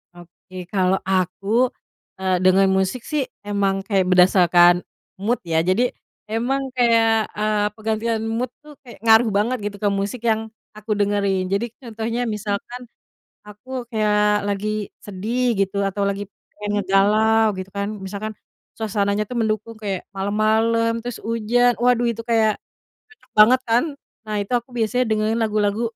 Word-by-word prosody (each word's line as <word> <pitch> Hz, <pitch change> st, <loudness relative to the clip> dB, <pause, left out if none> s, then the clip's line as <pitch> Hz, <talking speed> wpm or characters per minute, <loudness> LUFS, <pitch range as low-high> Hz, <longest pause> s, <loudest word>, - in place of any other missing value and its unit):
Oke, 180 Hz, +1 st, -11 dB
kalau 190 Hz, -1 st, +2 dB
aku, 195 Hz, +6 st, +1 dB, 0.5 s
eee, 185 Hz, -1 st, +1 dB
denger 190 Hz, +1 st, +5 dB
musik 190 Hz, +6 st, 0 dB
sih, 295 Hz, -4 st, -2 dB, 0.2 s
emang 200 Hz, -1 st, -1 dB
kayak 195 Hz, -2 st, +1 dB
berdasarkan 180 Hz, -1 st, +5 dB, 0.4 s
mood 225 Hz, +5 st, 0 dB
ya 165 Hz, -2 st, 0 dB
jadi 220 Hz, +7 st, +2 dB, 0.4 s
emang 245 Hz, +5 st, 0 dB
kayak, 225 Hz, -3 st, +3 dB
eee, 210 Hz, 0 st, +1 dB
penggantian 220 Hz, +1 st, -1 dB
mood 235 Hz, +2 st, -2 dB
tuh 300 Hz, 0 st, -13 dB
kayak 245 Hz, -, -13 dB
ngaruh 225 Hz, +1 st, +6 dB
banget 235 Hz, +5 st, +1 dB
gitu 205 Hz, -, -11 dB
ke 205 Hz, -, +3 dB
musik 200 Hz, +4 st, -3 dB
yang 225 Hz, -1 st, +1 dB, 0.3 s
aku 215 Hz, +1 st, -7 dB
dengerin. 200 Hz, -2 st, +1 dB
Jadi 200 Hz, +4 st, +1 dB, 0.2 s
contohnya 230 Hz, 0 st, -4 dB
misalkan 210 Hz, +3 st, -4 dB, 0.7 s
aku 245 Hz, +5 st, -7 dB
kayak 210 Hz, -2 st, +2 dB
lagi 210 Hz, +1 st, -2 dB
sedih 235 Hz, +5 st, -2 dB
gitu, 200 Hz, 0 st, 0 dB
atau 195 Hz, +1 st, -2 dB
lagi 200 Hz, 0 st, -3 dB, 0.3 s
pengen 205 Hz, 0 st, -5 dB
ngegalau 215 Hz, +3 st, +3 dB
gitu 185 Hz, 0 st, -6 dB
kan 200 Hz, +1 st, -3 dB
misalkan 205 Hz, +3 st, -5 dB, 0.4 s
suasananya 205 Hz, -1 st, 0 dB
tuh 250 Hz, -, -5 dB
mendukung 220 Hz, 0 st, -2 dB
kayak 200 Hz, -4 st, -3 dB
malam-malam 220 Hz, +3 st, +1 dB
terus 245 Hz, -2 st, -5 dB
hujan 230 Hz, +2 st, +2 dB
waduh 245 Hz, 0 st, +3 dB
itu 230 Hz, 0 st, -5 dB
kayak 220 Hz, -2 st, +2 dB, 0.5 s
cocok 435 Hz, -, -24 dB
banget 240 Hz, +5 st, +7 dB
kan. 235 Hz, +3 st, +4 dB, 0.4 s
Nah 215 Hz, -, -3 dB
itu 200 Hz, -, -17 dB
aku 240 Hz, +1 st, -1 dB
biasanya 235 Hz, +2 st, +1 dB
dengerin 220 Hz, +1 st, +1 dB
lagu-lagu 210 Hz, -1 st, 0 dB
215 Hz, 145 wpm, -21 LUFS, 200-230 Hz, 0.7 s, banget